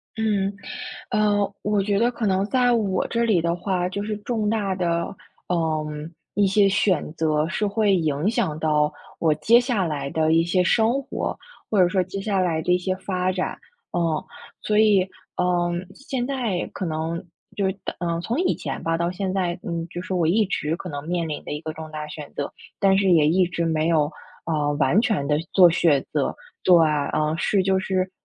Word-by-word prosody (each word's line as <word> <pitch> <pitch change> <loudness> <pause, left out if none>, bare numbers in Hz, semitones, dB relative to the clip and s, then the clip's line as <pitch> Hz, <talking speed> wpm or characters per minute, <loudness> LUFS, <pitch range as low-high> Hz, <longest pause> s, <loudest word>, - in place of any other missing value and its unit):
嗯， 205 -3 0 0.6
呃， 205 -2 +1
我 205 -1 +1
觉 200 0 +1
得 240 +2 +3
可 230 -2 -3
能 190 0 +2
在 245 0 +3
我 200 -5 +1
这 235 0 0
里 205 -7 +3
的 170 +1 0
话， 180 -1 -1
就 200 +2 -4
是 210 0 -3
重 215 -1 -1
大 205 -4 0
的， 170 0 -1 0.3
嗯， 155 -2 -2 0.2
一 205 -1 +3
些 195 +1 +4
选 190 -6 +1
择 155 -1 +1
是 210 +4 -1
会 205 -1 +2
影 155 +2 0
响 205 -10 0
到 150 -1 +2 0.3
我 160 -2 +3
接 220 +11 +5
下 240 -7 0
来 140 -3 -3
的 160 0 +1
一 165 0 +4
些 180 +1 +2
生 230 +8 +2
活， - - -4 0.3
或 205 -3 +3
者 180 - +6
说 185 0 +1
接 195 +2 -5
下 195 -2 0
来 165 -3 +1
的 180 +2 +1
一 180 - +4
些 185 +1 -1
发 185 -1 -1
展。 185 0 -3 0.4
嗯， 165 -3 0 0.4
所 210 0 +1
以， 205 -4 +4 0.3
嗯， 175 0 0
现 265 -2 -4
在 240 -10 -2
可 190 - -3
能 165 +1 -3 0.3
就 200 - 0
是 190 - +1 0.3
嗯， 170 -1 -1
从 230 - -2
以 365 - +2
前 - - -5
吧， 165 0 0
到 170 +1 0
现 185 +1 -3
在， 180 -2 -1
嗯， 170 -1 -3
就 175 - -6
是 190 - -6
我 175 -3 +2
一 210 +5 +3
直 165 -4 -2
可 180 - -7
能 145 0 -5
面 175 -2 0
临 150 - -4
的 - - -5
一 150 - -3
个 155 0 -4
重 155 0 -9
大 150 -1 -5
选 150 -1 -8
择， 145 - -3 0.3
但 195 -1 +4
是 195 -2 +3
也 160 -4 +5
一 180 +3 +3
直 170 -1 -2
没 160 -1 +1
有， 155 -2 +2 0.3
呃， 150 -3 0
完 145 +7 +3
全 215 -12 0
地 150 0 +2 0.2
做 180 -3 +8
选择。 150 -3 +1 0.3
对， 180 -2 +6 0.4
嗯， 155 0 +1
是 195 +2 +2
就 190 0 +2
是 185 -1 -1
180 Hz, 215 characters per minute, -23 LUFS, 160-200 Hz, 0.6 s, 做